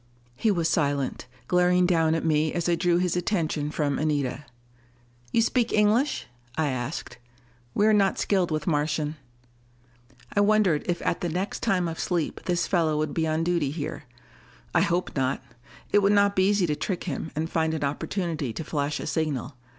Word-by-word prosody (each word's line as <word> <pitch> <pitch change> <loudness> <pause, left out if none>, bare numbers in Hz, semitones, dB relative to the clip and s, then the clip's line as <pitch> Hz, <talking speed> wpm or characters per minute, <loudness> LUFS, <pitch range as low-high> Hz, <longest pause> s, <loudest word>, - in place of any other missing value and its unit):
He 220 - +1
was 170 -5 +2
silent, 140 -6 0 0.2
glaring 180 0 +3
down 165 -3 +3
at 165 - -2
me 155 -1 +2
as 175 -1 -1
I 175 - +3
drew 170 0 +2
his 180 -1 +1
attention 165 -5 -1
from 145 -2 -1
Anita. 145 -3 -1 0.9
"You 230 - +3
speak 240 0 +1
English?" 215 +7 +2 0.3
I 155 -2 +1
asked. 125 0 -4 0.6
"We 205 - +3
are 220 - +5
not 200 -2 +3
skilled 190 -4 +1
with 155 -1 -2
Martian." 150 -1 0 1.2
I - - +3
wondered 205 -6 +3
if 175 -1 -1
at - - 0
the 175 - -1
next 185 +5 -2
time 185 -6 +1
of 165 -1 -5
sleep 175 -4 -1
this 175 -1 +1
fellow 165 -5 +1
would 155 0 -1
be 160 -1 0
on 155 +1 0
duty 170 -4 +1
here. 150 0 -5 0.7
I - - +4
hoped 175 +1 0
not: 135 -1 0 0.5
it 205 - +5
would 200 +1 +4
not 200 0 +4
be 190 +1 +4
easy 205 -3 +3
to 150 -3 0
trick 180 +3 -3
him 160 -1 -4
and 160 +2 -1
find 160 -1 0
an 155 - -3
opportunity 150 - -2
to 160 - -5
flash 145 -1 -2
a - - -5
signal. 150 -4 -2
165 Hz, 180 wpm, -26 LUFS, 150-180 Hz, 1.2 s, are